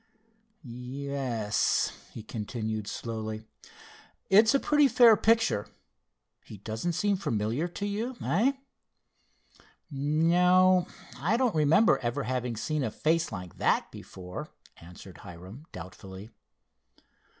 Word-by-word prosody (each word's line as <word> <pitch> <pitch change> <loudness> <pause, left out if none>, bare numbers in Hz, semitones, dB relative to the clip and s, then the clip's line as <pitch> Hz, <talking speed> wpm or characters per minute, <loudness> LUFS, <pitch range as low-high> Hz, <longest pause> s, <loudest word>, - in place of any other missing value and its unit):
"Ye 125 +3 -7
es," 115 -7 0 0.2
he 110 - -9
continued 110 -1 -4
slowly, 110 -1 -5 0.9
"it's 220 +6 +6
a - - +4
pretty 295 0 +4
fair 240 -4 +7
picture. 225 - +2 0.8
He 105 - -11
doesn't 110 - -3
seem 200 +3 +1
familiar 115 - -1
to 180 +3 -5
you; 225 +5 -3
eh?" 235 +10 +2 1.4
"No, 175 +6 +3 0.3
I 180 - +1
don't 250 -4 +1
remember 160 +10 +4
ever 120 +3 -2
having 125 -1 -2
seen 150 +6 -2
a 125 - -1
face 165 +7 0
like 90 -4 -8
that - - +1
before," 90 -1 -9 0.3
answered 90 +1 -13
Hiram, 95 - -11
doubtfully. 95 +4 -10
135 Hz, 110 wpm, -28 LUFS, -, 1.4 s, fair